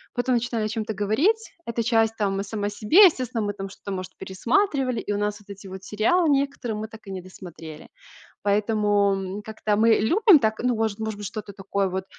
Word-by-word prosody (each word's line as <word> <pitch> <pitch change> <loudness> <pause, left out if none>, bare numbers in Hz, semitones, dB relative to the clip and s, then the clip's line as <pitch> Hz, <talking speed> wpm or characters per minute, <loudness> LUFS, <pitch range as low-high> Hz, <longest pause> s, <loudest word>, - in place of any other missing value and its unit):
потом 245 0 +1
начинали 235 -2 -1
о - - 0
чём-то 220 0 -3
говорить. 285 - 0
Эта 235 0 -2
часть 225 -1 +2
там 195 -2 0
и 200 - -1
сама 205 0 -3
себе. 215 - +6
Естественно, 255 - +1
мы 205 - -2
там 195 -1 -6
что-то, 200 +1 -9
может, 185 -1 -5
пересматривали, 255 - 0
и 205 - -4
у 205 - 0
нас 205 0 -2
вот 205 -1 -22
эти 200 0 -10
вот 190 0 -9
сериалы 300 - +2
некоторые 275 -5 0
мы 220 +1 -4
так 220 -1 -14
и 195 - -6
не 190 - -4
досмотрели. 170 -4 -11 0.6
Поэтому, 205 -1 +2
м, 195 +1 -5
как-то 215 -1 -2
мы 225 +1 +5
любим 365 - +5
так, 220 -4 0
ну, 250 -1 +2
может 220 -1 -1
может, 215 -2 -4
что-то 210 0 -7
такое 195 0 -2
вот, 190 +1 -3
215 Hz, 205 wpm, -24 LUFS, 200-235 Hz, 0.6 s, себе